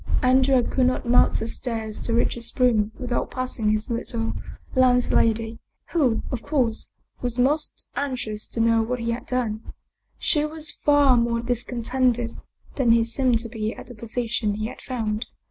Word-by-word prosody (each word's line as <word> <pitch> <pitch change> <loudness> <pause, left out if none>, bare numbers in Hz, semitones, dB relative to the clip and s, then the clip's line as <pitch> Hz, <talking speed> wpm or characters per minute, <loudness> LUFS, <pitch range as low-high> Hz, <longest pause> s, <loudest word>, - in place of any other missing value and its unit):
Andrea 260 0 +4
could 255 +1 +1
not 255 -1 -1
mount 245 +1 +4
the 225 - -2
stairs 225 -3 -3
to 230 - -2
reach 235 - +2
his 235 +2 -3
room 225 -4 +3
without 250 -1 -2
passing 255 -4 -1
his 215 +3 0
little 230 -1 -2 0.4
landlady, 230 -3 +2 0.3
who, 265 -10 +2
of 250 -4 -3
course, 250 -7 0 0.3
was 245 -1 -2
most 285 +5 0
anxious 250 -7 -3
to - - -4
know 230 0 +4
what 245 +3 -1
he 230 0 -1
had 235 - -5
done. 230 -4 -1 0.6
She 300 -2 +2
was 310 0 -4
far 290 -3 +4
more 235 0 +1
discontented 245 0 0 0.5
than 240 -4 +4
he 230 0 +4
seemed 240 +1 +2
to 230 - -5
be 220 -1 -3
at - - -10
the - - -8
position 225 -2 -2
he 215 +1 -3
had 225 - -7
found. 225 -3 -3
240 Hz, 165 wpm, -24 LUFS, 225-255 Hz, 0.6 s, Andrea